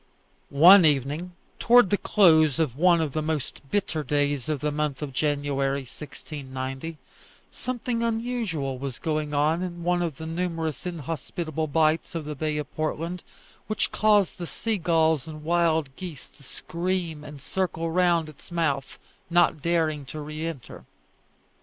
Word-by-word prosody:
One 175 +7 +8
evening, 150 +4 +1 0.3
towards 240 -4 +6
the 205 - +2
close 160 - +5
of 155 -7 0
one 170 +2 +4
of 155 -3 -1
the 155 - -1
most 155 -3 -3
bitter 185 -5 -1
days 145 -1 0
of 150 -2 0
the 150 +1 -1
month 150 -1 -2
of 140 -3 -5
January, 140 -1 0
1690, 135 +2 -7 0.5
something 245 -1 -3
unusual 225 - -2
was 135 -2 -5
going 155 -2 -2
on 155 +4 +2
in 175 -2 -5
one 175 0 +1
of 165 -6 -2
the 160 - -7
numerous 165 -1 -3
inhospitable 160 -1 -4
bights 155 +3 +1
of 160 -2 -3
the 150 - -4
bay 150 +1 -2
of 150 -3 -6
Portland, 165 +3 -2 0.5
which 215 - -1
caused 210 -4 +3
the 175 - -4
sea 220 +2 -2
gulls 160 -4 +2
and 155 -1 -8
wild 160 -4 +1
geese 170 -8 -8
to - - -20
scream 170 +2 -3
and 150 -1 -10
circle 165 +1 -2
round 170 -2 +2
its 155 +3 -14
mouth, 145 -6 -1 0.3
not 175 -3 +3
daring 160 -3 0
to 155 +4 -7
re 155 +2 -5
enter. 150 -7 -8
160 Hz, 155 wpm, -26 LUFS, 145-175 Hz, 0.5 s, One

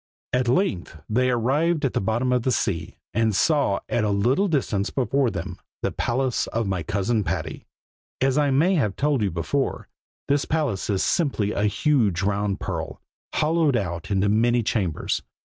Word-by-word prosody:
At 125 -1 +1
length 120 - 0
they 125 +4 +2
arrived 145 +7 +1
at 130 - -1
the - - 0
bottom 120 +5 0
of 125 - +2
the 130 - 0
sea, 110 - -2 0.2
and 110 -1 +1
saw 140 -7 +2
at 120 - 0
a 105 - +1
little 120 - +2
distance 115 - 0
before 135 0 +1
them, 85 -6 -6 0.2
the - - 0
palace 130 +1 -1
of 115 0 -2
my 95 -3 -1
cousin 105 +5 0
Patty. 85 -3 -4 0.5
As 135 0 +2
I 145 -1 +3
may 155 +8 +3
have 110 - +1
told 145 -3 +1
you 100 - +1
before, 95 +11 -2 0.4
this 140 0 +1
palace 145 -13 -1
is 100 -2 +1
simply 135 - +1
a 105 - 0
huge 105 - +1
round 100 0 0
pearl, 80 -4 -4 0.4
hollowed 155 -4 +2
out 85 -4 -4
into 100 0 +2
many 120 +3 +3
chambers. 95 -7 -1
115 Hz, 170 wpm, -24 LUFS, 100-140 Hz, 0.5 s, I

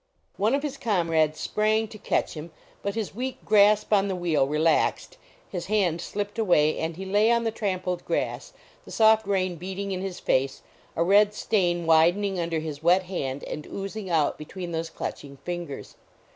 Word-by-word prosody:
One 215 +6 +2
of 280 - -2
his 285 -2 -4
comrades 165 - +1
sprang 215 +1 +1
to 215 - -11
catch - - -1
him, 155 +1 -7 0.3
but 200 +1 -3
his 220 -4 -3
weak 255 +4 -5
grasp 210 0 +4
on 200 -1 +4
the 190 - -2
wheel 165 -6 +1
relaxed, 155 +2 +1 0.3
his 175 -3 -5
hand 185 -5 +1
slipped 205 +4 -4
away 155 -8 +3
and 160 0 -3
he 190 - -6
lay 205 +3 +3
on 235 0 +3
the 225 - 0
trampled 185 -5 -2
grass, - - -2 0.3
the - - -14
soft 220 -1 +4
rain 185 -3 0
beating 190 +3 -5
in 185 -1 -3
his 190 -2 -5
face, 135 +1 0 0.3
a 165 - +2
red 205 +3 +4
stain 175 -7 0
widening 175 +4 +3
under 165 -1 -1
his 155 -2 -5
wet 180 +3 +4
hand 145 -7 -4
and 150 - -6
oozing 195 0 -6
out 160 -4 +1
between 175 +3 -7
those 165 0 -3
clutching 140 -1 -7
fingers. 175 -4 -6
185 Hz, 180 wpm, -26 LUFS, 165-210 Hz, 0.3 s, grasp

